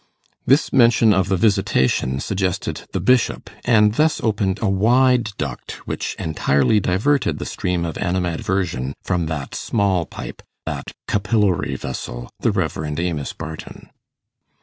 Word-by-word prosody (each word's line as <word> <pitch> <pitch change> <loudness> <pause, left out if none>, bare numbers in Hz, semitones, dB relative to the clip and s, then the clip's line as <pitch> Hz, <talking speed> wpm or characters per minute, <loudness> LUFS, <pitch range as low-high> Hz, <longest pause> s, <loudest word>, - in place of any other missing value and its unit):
This 140 +4 +3
mention 115 -3 +5
of 95 -1 +1
the 95 - +2
visitation 95 - +1
suggested 95 +2 -2
the - - -2
Bishop, 125 -5 +1
and 105 -3 +4
thus 155 +6 +2
opened 105 -3 0
a 110 - 0
wide 120 +4 +3
duct, 70 -5 -5
which - - -3
entirely 75 +3 +2
diverted 120 +9 +1
the - - -5
stream 90 -2 -2
of 80 - -5
animadversion 90 -6 -1
from 90 -4 -1
that 75 -4 -4
small 95 -6 0
pipe - - -8 0.2
that - - -4 0.2
capillary 100 -7 +1
vessel, - - -6
the - - +2
Rev. 75 -1 -2
Amos 85 -4 -2
Barton. 80 -1 -9
95 Hz, 130 wpm, -21 LUFS, 80-110 Hz, 0.2 s, mention